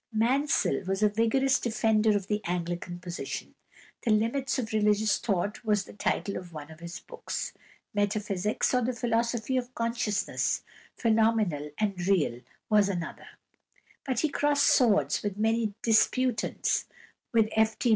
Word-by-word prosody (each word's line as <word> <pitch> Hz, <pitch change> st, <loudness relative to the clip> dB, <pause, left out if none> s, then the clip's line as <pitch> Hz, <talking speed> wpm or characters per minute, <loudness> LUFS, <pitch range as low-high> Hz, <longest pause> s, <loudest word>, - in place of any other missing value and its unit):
Mansel 255 Hz, +6 st, +1 dB
was 195 Hz, +2 st, 0 dB
a 210 Hz, -, +5 dB
vigorous 245 Hz, +6 st, +2 dB
defender 220 Hz, -2 st, +2 dB
of 195 Hz, -, -5 dB
the 210 Hz, +1 st, -1 dB
Anglican 175 Hz, 0 st, -3 dB
position. 175 Hz, -1 st, -6 dB, 0.5 s
"The 235 Hz, -, -1 dB
Limits 230 Hz, +6 st, +1 dB
of 230 Hz, -4 st, -3 dB
Religious 210 Hz, 0 st, +2 dB
Thought" 200 Hz, +1 st, -1 dB
was 210 Hz, -3 st, +2 dB
the -, -, -13 dB
title 200 Hz, -1 st, -1 dB
of 180 Hz, -1 st, -9 dB
one 150 Hz, 0 st, -8 dB
of 160 Hz, -, -13 dB
his 170 Hz, +2 st, -7 dB
books; -, -, -5 dB, 0.4 s
"Metaphysics, 205 Hz, 0 st, 0 dB
or 250 Hz, -, +3 dB
the 250 Hz, +2 st, 0 dB
Philosophy 235 Hz, +1 st, 0 dB
of 250 Hz, 0 st, -4 dB
Consciousness, 230 Hz, -3 st, -1 dB, 0.3 s
Phenomenal 220 Hz, -, +2 dB
and 195 Hz, -4 st, -1 dB
Real" 155 Hz, -11 st, +1 dB, 0.3 s
was 210 Hz, -2 st, +4 dB
another, 175 Hz, -4 st, -5 dB, 0.8 s
but 260 Hz, -3 st, -1 dB
he 310 Hz, -, +1 dB
crossed 290 Hz, 0 st, +2 dB
swords 200 Hz, -, +3 dB
with 205 Hz, -1 st, -3 dB
many 220 Hz, -1 st, +1 dB
disputants, 240 Hz, +2 st, +2 dB, 0.4 s
with 225 Hz, -2 st, +4 dB
F. 220 Hz, 0 st, +2 dB
D. 245 Hz, -, +1 dB
215 Hz, 145 wpm, -28 LUFS, 195-235 Hz, 0.8 s, a